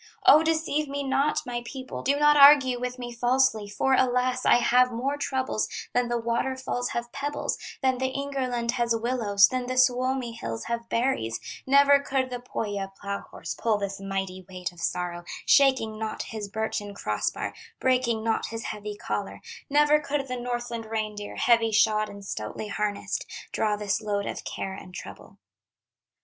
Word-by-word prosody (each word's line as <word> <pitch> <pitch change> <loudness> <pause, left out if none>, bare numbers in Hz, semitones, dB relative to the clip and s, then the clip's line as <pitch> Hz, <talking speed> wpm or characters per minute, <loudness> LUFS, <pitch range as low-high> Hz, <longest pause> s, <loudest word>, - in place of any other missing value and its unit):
"O, 305 - +8
deceive 315 -2 0
me 280 0 -3
not, 275 +2 +1
my 240 -1 -3
people, 260 +1 -7
Do 280 - +2
not 295 0 +6
argue 280 -3 +7
with 250 0 -4
me 245 -1 -6
falsely, 240 -3 +2
For 265 +6 +1
alas! 255 0 +2
I - - +7
have 250 +1 +4
more 260 +5 -1
troubles 265 -5 -1 0.2
Than 245 0 +2
the 240 0 0
waterfalls 245 +2 -2
have 235 0 -4
pebbles, 285 +1 -3 0.2
Than 260 -1 +2
the 260 0 0
Ingerland 260 -4 -2
has 235 -2 +1
willows, 225 -4 +3
Than 255 -1 -2
the 255 0 -3
Suomi 255 0 +2
hills 115 - -5
have 235 0 -4
berries; 230 - 0 0.3
Never 280 +1 +6
could 265 -2 -1
the 245 - -3
Pohya 205 -5 -4
plow 200 0 -3
horse - - -7
Pull 225 -2 0
this 200 -1 -4
mighty 195 -1 -4
weight 180 -1 -5
of 175 -1 -13
sorrow, 175 0 -2 0.2
Shaking 260 -6 +4
not 220 -1 -3
his 215 -2 -6
birchen 205 -1 -3
cross - - -1
bar, - - -5 0.3
Breaking 250 -4 +1
not 225 0 0
his 225 0 -6
heavy 210 -1 -5
collar; - - -4 0.3
Never 295 +1 +5
could 285 -1 -2
the 255 - -3
Northland 240 -2 -4
reindeer 215 -2 -4
Heavy 230 -2 +3
shod 215 0 +3
and 200 -1 -10
stoutly 150 - -5
harnessed, 205 0 -2 0.3
Draw 215 -1 +1
this 205 0 -1
load 205 -2 -1
of - - -5
care 190 - -4
and 185 -1 -10
trouble." - - -10
240 Hz, 170 wpm, -26 LUFS, 210-260 Hz, 0.3 s, O